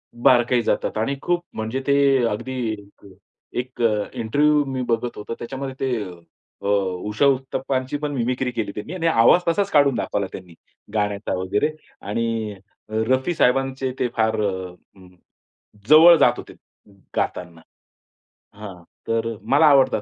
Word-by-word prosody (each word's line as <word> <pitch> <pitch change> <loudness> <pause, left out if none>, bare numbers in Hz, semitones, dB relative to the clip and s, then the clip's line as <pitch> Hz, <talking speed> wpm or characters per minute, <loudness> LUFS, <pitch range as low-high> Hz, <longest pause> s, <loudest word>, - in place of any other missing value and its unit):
बारकाई 120 0 +3
जातात 110 - -1
आणि 135 +6 -1
खूप 175 0 0
म्हणजे 110 +4 -3
ते 140 - +4 0.3
अगदी 120 +5 -4 1.1
एक 125 -1 -6
अ, 105 -3 +1
इंटरव्ह्यू 145 +6 +2
मी 130 -1 -3
बघत 120 +1 -1
होतो. 105 +2 -6
त्याच्यामध्ये 135 +2 -6
ते 125 -5 -1 0.6
अ, - - -4 0.4
उषा 105 +7 +1
उत्तप्पांची 130 0 -1
पण 150 0 -3
मिमिक्री 125 0 -1
केली 110 -4 -3
त्यांनी 125 - -6
आणि 165 -2 -1
आवाज 140 +5 +5
तसाच 200 +4 +1
काढून 140 -3 +4
दाखवला 100 -3 -2
त्यांनी 90 -2 -10 0.4
गाण्याचा 105 -1 -1
वगैरे 100 +10 0 0.3
आणि 110 +1 -2 0.4
अ, - - -11
रफी 130 +7 +1
साहेबांचे 135 -1 +1
ते 125 - +1
फार 110 -1 +1
अ, 95 -3 -3 1.2
जवळ 165 +3 +9
जात - - +4
होते - - -10 0.6
गातांना. 85 -2 -3 0.9
हां, 100 -4 -10 0.2
तर 115 0 -1
मला 145 +4 +3
आवडतात. 135 -6 +4
125 Hz, 135 wpm, -22 LUFS, 110-135 Hz, 1.2 s, जवळ